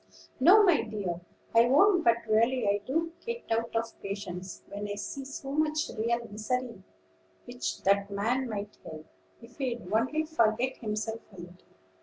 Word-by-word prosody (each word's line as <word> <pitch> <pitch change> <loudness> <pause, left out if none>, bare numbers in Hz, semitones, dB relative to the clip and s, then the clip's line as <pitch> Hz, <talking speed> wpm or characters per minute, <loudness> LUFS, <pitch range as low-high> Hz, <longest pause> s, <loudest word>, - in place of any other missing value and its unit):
"No, 375 +11 +8
my 355 -6 +5
dear, 195 -6 -4 0.3
I 230 +1 +7
won't; 355 +7 +5
but 235 0 +3
really 230 +2 +3
I 200 0 +2
do 330 +5 0
get 470 0 -4
out 230 +1 0
of 230 0 -2
patience 190 -2 -6
when 205 +1 -5
I 205 - -3
see 240 +7 -5
so 275 0 -6
much 310 +1 0
real 235 +1 -1
misery 225 +1 -3 0.6
which 245 0 -4
that 200 +1 +3
man 235 +6 0
might 205 -1 -5
help, 155 0 -9 0.4
if 235 +3 -15
he'd 245 -7 -3
only 260 +8 +2
forget 255 -4 +1
himself 220 0 -3
a 185 - -9
little. 175 +1 -14
230 Hz, 160 wpm, -29 LUFS, 205-265 Hz, 0.6 s, No